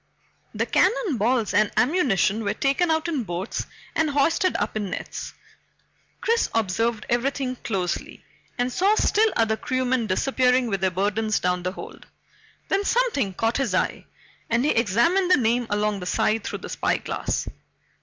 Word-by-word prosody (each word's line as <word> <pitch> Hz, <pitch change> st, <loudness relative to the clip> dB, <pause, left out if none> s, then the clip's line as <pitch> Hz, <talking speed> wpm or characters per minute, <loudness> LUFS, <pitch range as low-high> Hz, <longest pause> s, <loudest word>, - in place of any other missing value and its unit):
The -, -, 0 dB
cannon 380 Hz, -, +2 dB
balls 225 Hz, -1 st, +1 dB
and 210 Hz, +1 st, +3 dB
ammunition 240 Hz, -, +2 dB
were 200 Hz, -, -1 dB
taken 280 Hz, +6 st, +1 dB
out 320 Hz, +1 st, +1 dB
in 300 Hz, -7 st, -1 dB
boats 180 Hz, +1 st, -4 dB, 0.3 s
and 320 Hz, -1 st, +2 dB
hoisted 325 Hz, +7 st, +2 dB
up -, -, -2 dB
in 205 Hz, -3 st, -2 dB
nets. -, -, -6 dB, 0.9 s
Chris 460 Hz, +1 st, +1 dB
observed 225 Hz, +1 st, 0 dB
everything 255 Hz, +1 st, -1 dB
closely, 185 Hz, -7 st, -4 dB, 0.3 s
and 245 Hz, +1 st, 0 dB
saw 400 Hz, +4 st, +3 dB
still 435 Hz, 0 st, +3 dB
other 225 Hz, -1 st, +2 dB
crewmen 255 Hz, -2 st, -1 dB
disappearing 255 Hz, +5 st, +2 dB
with 195 Hz, -1 st, -1 dB
their 190 Hz, -, +3 dB
burdens 205 Hz, +4 st, 0 dB
down 180 Hz, 0 st, 0 dB
the 180 Hz, +1 st, -3 dB
hold. -, -, -10 dB, 0.6 s
Then 390 Hz, +1 st, +1 dB
something 405 Hz, -, +1 dB
caught 225 Hz, +4 st, 0 dB
his 250 Hz, -9 st, 0 dB
eye -, -, -1 dB, 0.4 s
and 235 Hz, +3 st, +2 dB
he 300 Hz, -, +3 dB
examined 240 Hz, -, +2 dB
the 365 Hz, -, +6 dB
name 240 Hz, -1 st, +1 dB
along 210 Hz, 0 st, 0 dB
the 180 Hz, -, -6 dB
side 215 Hz, +4 st, +1 dB
through -, -, -5 dB
the -, -, -7 dB
spyglass. -, -, -2 dB
235 Hz, 155 wpm, -24 LUFS, 205-290 Hz, 0.9 s, the